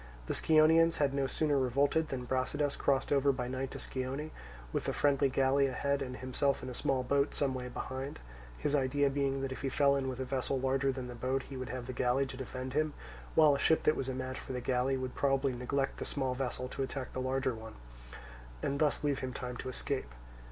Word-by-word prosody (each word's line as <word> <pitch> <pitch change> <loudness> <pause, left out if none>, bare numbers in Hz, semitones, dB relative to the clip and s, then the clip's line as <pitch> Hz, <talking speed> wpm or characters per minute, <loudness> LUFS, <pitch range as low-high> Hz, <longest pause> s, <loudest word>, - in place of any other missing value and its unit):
The - - -2
Scionaeans 160 +1 +5
had 140 -2 +2
no 140 -1 +1
sooner 145 0 +1
revolted 140 +5 +2
than 125 -2 -3
Brasidas 130 +3 0
crossed 135 -1 +1
over 140 0 +4
by 125 -2 -3
night 130 +1 -3
to - - -7
Scione, 135 +4 -4 0.4
with - - -1
a - - 0
friendly 140 -1 +3
galley 135 +1 +3
ahead 140 +2 0
and 125 -1 -4
himself 130 +2 0
in 130 - -4
a - - -6
small 130 +1 0
boat 140 +2 +1
some 140 -2 +1
way 125 -1 -4
behind; 130 +2 -5 0.4
his 145 - -1
idea 140 0 +2
being 135 -1 0
that 135 - -2
if 130 - -5
he 135 - -1
fell 140 +1 +4
in 135 -1 -1
with 130 0 -5
a 130 - -2
vessel 130 +1 -1
larger 135 +1 +1
than 130 -1 -5
the 125 - -6
boat 130 +3 -1
he 135 - -9
would 130 -2 -5
have 125 -1 -4
the 130 - -5
galley 125 +2 +2
to 135 - -7
defend 130 0 -5
him, 155 +1 +1 0.4
while 155 -2 +7
a 140 - 0
ship 160 - +3
that 155 - +4
was 135 - -2
a 130 - -2
match 130 0 -4
for - - -7
the 125 - -2
galley 130 +2 +1
would 130 -1 -4
probably 135 -1 +1
neglect 135 +3 -1
the - - -4
small 135 -3 -1
vessel 125 -1 -2
to 135 - -5
attack 135 -1 -4
the 130 - -2
large 130 +1 -1
one, 110 -3 -3 0.9
and 140 - 0
thus 150 -1 +2
leave 145 -2 +1
him 130 -1 -4
time 125 0 -5
to 130 - -5
escape. - - -3
135 Hz, 230 wpm, -33 LUFS, 130-140 Hz, 0.9 s, while